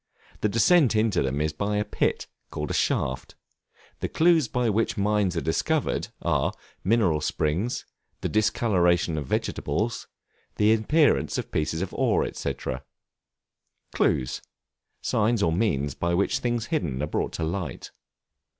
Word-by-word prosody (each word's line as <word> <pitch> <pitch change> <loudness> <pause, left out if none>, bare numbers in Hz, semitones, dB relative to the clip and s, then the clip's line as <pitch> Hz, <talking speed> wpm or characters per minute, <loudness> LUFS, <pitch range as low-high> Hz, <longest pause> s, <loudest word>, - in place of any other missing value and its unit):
The 105 - +1
descent 115 - +4
into 110 -1 +2
them 70 +1 -1
is 75 0 0
by 100 +6 -1
a 105 - 0
pit, - - -1 0.2
called 75 0 -4
a - - -1
shaft; 65 0 -1 0.6
the - - -2
clues 165 -4 +4
by 125 +1 0
which 110 +1 0
mines 100 -3 +1
are - - +1
discovered, 80 - 0 0.2
are, - - +1 0.3
mineral 95 -8 +2
springs, 80 +10 -1 0.4
the - - -1
discoloration 90 -6 +2
of 75 -3 -4
vegetables, 105 - -2 0.5
the 105 +1 +4
appearance 145 +7 +2
of - - -4
pieces 80 +3 -1
of 95 - -6
ore, - - +2
&c. - - -3 1.4
Clues, 65 -2 +1 0.6
signs 110 0 +1
or 80 - +3
means 75 -8 0
by 85 +3 -1
which 100 +7 +1
things 120 -3 -1
hidden 75 - -1
are - - +2
brought 75 - -2
to 80 - -3
light. 85 -4 -4
100 Hz, 140 wpm, -26 LUFS, 80-115 Hz, 1.4 s, descent